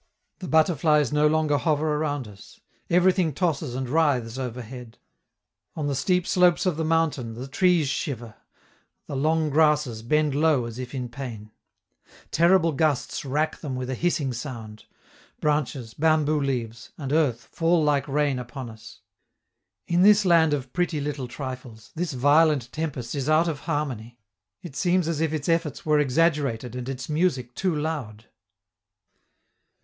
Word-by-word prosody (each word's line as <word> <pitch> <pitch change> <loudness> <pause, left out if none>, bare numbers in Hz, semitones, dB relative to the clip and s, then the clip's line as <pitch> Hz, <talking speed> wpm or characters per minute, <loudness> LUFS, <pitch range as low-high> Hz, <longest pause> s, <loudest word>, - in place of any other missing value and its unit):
The 185 - -6
butterflies 155 -3 +3
no 150 0 +4
longer 150 -2 +2
hover 155 +2 +1
around 145 -5 -2
us; 100 -1 -15 0.3
everything 180 -2 +3
tosses 155 -5 -1
and 130 0 -3
writhes 130 -5 +1
overhead: 125 -1 -7 0.8
on 155 - -3
the 145 - 0
steep 180 +6 +1
slopes 180 0 +3
of 180 -4 +1
the 160 - -2
mountain 155 -8 0
the 125 +3 -7
trees 175 +1 +2
shiver, 130 -6 -4 0.7
the 140 - -6
long 155 +2 +1
grasses 150 -6 +2
bend 150 +5 +1
low 145 -4 +2
as 115 +1 -7
if 125 +1 -6
in 125 -2 -3
pain; 115 -4 -8 0.8
terrible 170 0 +4
gusts 145 -2 0
rack 150 +3 -1
them 140 -5 -5
with 130 0 -4
a - - -1
hissing 145 -2 0
sound; 115 -4 -8 0.5
branches, 140 -6 -1
bamboo 155 -1 +2
leaves, 120 -4 -3
and 140 -1 -4
earth 140 -7 +2
fall 165 -1 +2
like 145 -1 +1
rain 145 -2 0
upon 125 0 -7
us. 110 0 -14 0.8
In 175 +1 +1
this 205 +1 +6
land 165 -3 +5
of 135 -3 -3
pretty 175 -3 0
little 140 -3 -4
trifles, 125 -3 -8
this 170 -1 -3
violent 145 -1 +3
tempest 140 -7 -4
is 140 0 -2
out 155 +2 +4
of 155 -4 -2
harmony; 125 -7 -3 0.5
it 160 -6 -9
seems 180 -1 +1
as 165 -2 -1
if 160 -2 +1
its 155 -3 -3
efforts 165 -4 -1
were 150 -1 +3
exaggerated 135 -5 +1
and 125 +1 -5
its 130 -2 -5
music 150 -6 0
too 185 +1 -1
loud. 145 -9 -4
145 Hz, 155 wpm, -25 LUFS, 125-160 Hz, 0.8 s, this